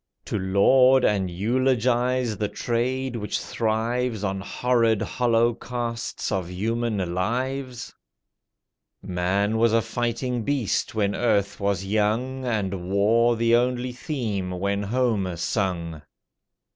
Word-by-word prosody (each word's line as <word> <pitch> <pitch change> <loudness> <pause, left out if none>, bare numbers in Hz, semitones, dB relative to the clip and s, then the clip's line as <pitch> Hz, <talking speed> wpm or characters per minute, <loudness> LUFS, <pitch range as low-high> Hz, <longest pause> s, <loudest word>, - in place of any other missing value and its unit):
To 105 - -2
laud 125 +8 +5
and 100 -3 +1
eulogize 125 +3 +1
the 105 - -1
trade 125 +3 -2
which 105 -2 -2
thrives 115 0 -1
On 95 -1 -2
horrid 115 +1 +1
holocausts 120 0 -1
of 95 -3 -2
human 105 -1 -2
lives? 125 +6 -3 1.1
Man 100 +4 0
was 115 -1 +3
a 115 - +4
fighting 120 +1 -2
beast 125 -4 -1
when 100 -2 +1
earth 100 -4 0
was 100 -2 -1
young, 110 +6 0
And 95 -6 -2
war 115 +4 +3
the 115 +1 +3
only 125 +1 0
theme 115 - -3
when 100 +2 -1
Homer 105 -5 0
sung. 85 -3 -2
115 Hz, 110 wpm, -24 LUFS, 100-125 Hz, 1.1 s, laud